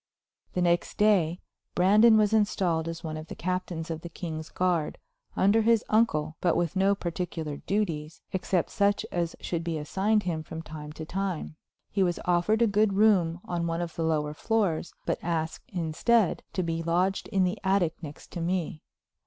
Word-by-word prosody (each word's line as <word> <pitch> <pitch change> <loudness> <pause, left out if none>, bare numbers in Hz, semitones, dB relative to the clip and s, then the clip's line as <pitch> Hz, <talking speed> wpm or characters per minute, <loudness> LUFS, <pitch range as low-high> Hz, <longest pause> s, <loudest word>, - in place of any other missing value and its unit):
The 180 - +1
next 175 0 +1
day 185 -5 +3 0.3
Brandon 210 +5 +6
was 215 0 +3
installed 180 -6 +1
as 165 0 -5
one 155 -1 -4
of 155 +1 -8
the - - -7
captains 175 -2 -3
of 160 -1 -4
the 170 - -7
king's 160 -2 -6
guard, 175 -4 0 0.4
under 205 +4 +4
his 230 0 +3
uncle, 160 -9 +2
but 175 -2 +2
with 175 +1 0
no 195 +1 +3
particular 170 -4 -4
duties, 165 -6 -2
except 185 -2 0
such 205 0 +2
as 170 -1 -1
should 170 -1 -2
be 165 -1 -2
assigned 200 +8 +1
him 165 -3 -2
from 160 +1 -7
time 150 -1 -8
to 160 +1 -7
time. 185 -3 -3 0.4
He 195 - 0
was 175 -2 +1
offered 180 +6 +3
a - - +6
good 210 -1 +2
room 190 -5 +3
on 170 -1 -2
one 165 0 -1
of 175 -1 -4
the - - -3
lower 150 -2 0
floors, 190 -3 0
but - - -1
asked, 160 -2 -3
instead, 180 +5 +1
to 185 - 0
be 165 -1 -2
lodged 180 +4 0
in 190 -1 +1
the 185 +4 -1
attic 190 -4 +2
next 150 -3 -10
to 170 - -5
me. 175 -1 -2
175 Hz, 180 wpm, -28 LUFS, 160-195 Hz, 0.4 s, Brandon